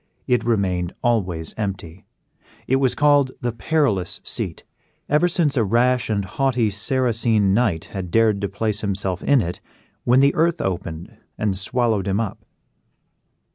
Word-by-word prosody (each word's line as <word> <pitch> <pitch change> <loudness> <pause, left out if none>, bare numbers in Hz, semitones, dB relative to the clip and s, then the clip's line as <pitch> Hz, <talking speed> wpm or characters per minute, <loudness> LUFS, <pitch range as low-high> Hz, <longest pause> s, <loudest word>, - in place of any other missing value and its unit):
It 125 -1 +1
remained 95 -6 0
always 90 -9 0
empty. 95 -4 -5 0.6
It 130 - +3
was 130 -2 +1
called 145 -2 +3
the 120 -1 -1
PERILOUS 110 - 0
SEAT, - - -3 0.4
ever 150 +4 +3
since 165 -5 +1
a 120 - +2
rash 120 +4 +2
and 100 -3 0
haughty 125 -1 0
Saracen 115 -2 +1
knight 100 -8 +1
had 95 -3 -4
dared 110 0 +2
to 100 - -2
place 105 +1 -2
himself 95 -3 -1
in 140 -5 +3
it, 85 +1 -5 0.4
when 125 +2 +4
the 140 +1 +4
earth 170 +1 +1
opened 85 -3 -4 0.2
and 105 -3 0
swallowed 110 0 0
him 100 +1 0
up. 115 -4 -4
110 Hz, 145 wpm, -22 LUFS, 95-125 Hz, 0.6 s, when